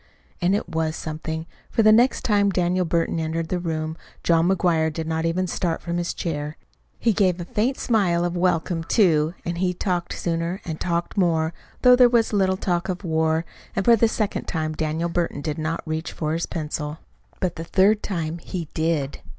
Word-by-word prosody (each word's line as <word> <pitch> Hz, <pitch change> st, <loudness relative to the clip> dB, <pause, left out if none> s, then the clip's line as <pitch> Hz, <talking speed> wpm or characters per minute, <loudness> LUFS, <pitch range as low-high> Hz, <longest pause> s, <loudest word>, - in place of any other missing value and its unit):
And 180 Hz, +3 st, +3 dB
it 205 Hz, -, -2 dB
was 160 Hz, -2 st, -1 dB
something; 160 Hz, 0 st, -4 dB, 0.2 s
for 225 Hz, -, +2 dB
the 215 Hz, -, +7 dB
next 240 Hz, +4 st, +4 dB
time 205 Hz, -2 st, +3 dB
Daniel 180 Hz, -1 st, +1 dB
Burton 165 Hz, 0 st, 0 dB
entered 160 Hz, +1 st, -2 dB
the 180 Hz, -, 0 dB
room, 160 Hz, -2 st, -3 dB, 0.3 s
John 170 Hz, +1 st, +3 dB
McGuire 170 Hz, -4 st, +2 dB
did 160 Hz, +1 st, -4 dB
not 160 Hz, +1 st, -1 dB
even 180 Hz, +3 st, 0 dB
start 170 Hz, -1 st, -1 dB
from 170 Hz, 0 st, -3 dB
his 175 Hz, 0 st, -2 dB
chair. 150 Hz, -2 st, -3 dB, 0.4 s
He 230 Hz, -, +2 dB
gave 185 Hz, -4 st, +2 dB
a 175 Hz, -, -4 dB
faint 240 Hz, +5 st, 0 dB
smile 185 Hz, -8 st, +2 dB
of 175 Hz, 0 st, -2 dB
welcome, 175 Hz, -1 st, +1 dB
too, 165 Hz, -4 st, +3 dB
and 170 Hz, 0 st, -3 dB
he 180 Hz, -1 st, +1 dB
talked 175 Hz, -2 st, -1 dB
sooner, 170 Hz, +2 st, -2 dB
and 160 Hz, -2 st, -4 dB
talked 170 Hz, +3 st, -1 dB
more 165 Hz, -3 st, +2 dB, 0.3 s
though 250 Hz, -1 st, +8 dB
there 250 Hz, -1 st, +6 dB
was 230 Hz, -2 st, +2 dB
little 190 Hz, -2 st, +2 dB
of 180 Hz, +1 st, -1 dB
war 160 Hz, -1 st, +1 dB
talk; -, -, -24 dB, 0.2 s
and 195 Hz, -, 0 dB
for 235 Hz, -, +7 dB
the 230 Hz, +1 st, +4 dB
second 215 Hz, -2 st, -2 dB
time 155 Hz, -1 st, -2 dB
Daniel 160 Hz, +2 st, -1 dB
Burton 170 Hz, -4 st, -1 dB
did 150 Hz, +1 st, -3 dB
not 155 Hz, +1 st, -2 dB
reach 160 Hz, +1 st, -3 dB
for 155 Hz, -1 st, -2 dB
his 165 Hz, +1 st, -1 dB
pencil. 150 Hz, -1 st, -4 dB, 0.4 s
But 180 Hz, -2 st, -1 dB
the 165 Hz, -, -5 dB
third 200 Hz, +5 st, +3 dB
time 170 Hz, -3 st, -3 dB
he 165 Hz, -2 st, -5 dB
did. 160 Hz, -4 st, -1 dB
170 Hz, 195 wpm, -23 LUFS, 160-185 Hz, 0.4 s, though